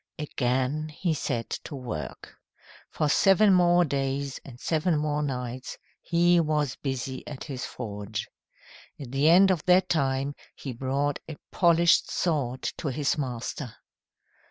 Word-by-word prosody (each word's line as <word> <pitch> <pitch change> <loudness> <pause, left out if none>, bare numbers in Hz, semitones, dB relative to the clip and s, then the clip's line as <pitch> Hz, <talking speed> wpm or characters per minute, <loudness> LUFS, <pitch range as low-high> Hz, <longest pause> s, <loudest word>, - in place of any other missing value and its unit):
Again 140 0 -1
he 160 +2 -1
set 125 -6 -3
to 145 - -6
work. 120 - -6 0.6
For 150 - -1
seven 195 +6 +5
more 175 -1 +5
days 140 -1 -2
and 125 -2 -12
seven 160 +2 +1
more 150 0 0
nights 125 -3 -4 0.2
he 175 +1 +3
was 150 -4 0
busy 130 -1 -4
at 145 -3 -7
his 135 -4 -5
forge. 105 -3 -5 0.7
At 135 -4 -8
the 140 +3 +3
end 190 +3 +7
of 175 -5 -1
that 185 +1 +4
time 135 -2 0 0.2
he 135 - -6
brought 135 +3 -1
a 155 - -7
polished 170 -1 +4
sword 135 -7 -1 0.2
to - - -3
his 145 +3 0
master. 125 -2 -4
145 Hz, 135 wpm, -27 LUFS, 130-165 Hz, 0.7 s, end